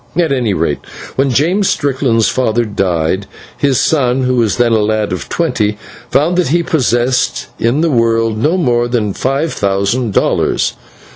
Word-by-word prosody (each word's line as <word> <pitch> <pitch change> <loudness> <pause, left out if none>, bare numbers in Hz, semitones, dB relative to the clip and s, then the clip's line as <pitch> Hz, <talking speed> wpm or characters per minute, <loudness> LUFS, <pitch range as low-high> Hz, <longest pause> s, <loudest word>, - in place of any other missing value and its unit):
At 170 -4 +2
any 120 -7 0
rate, 80 -3 -1 0.4
when 135 +1 +1
James 170 - +1
Strickland's 130 -5 +1
father 120 -2 0
died, 95 -2 -1 0.3
his 140 -3 +1
son, 130 -4 +1
who 125 0 +1
was 115 -4 +1
then 120 -1 +2
a 110 - +3
lad 105 -2 0
of 90 - -5
twenty, 110 -11 -1 0.3
found 160 +8 +1
that 180 - +1
he 170 +5 +1
possessed 130 -4 0
in 120 +6 +1
the 165 -1 +1
world 115 -2 +1
no 150 +11 +1
more 120 -8 +1
than 110 -5 -1
five 140 +8 -1
thousand 100 +4 0
dollars. - - +1
120 Hz, 160 wpm, -14 LUFS, 110-140 Hz, 0.4 s, a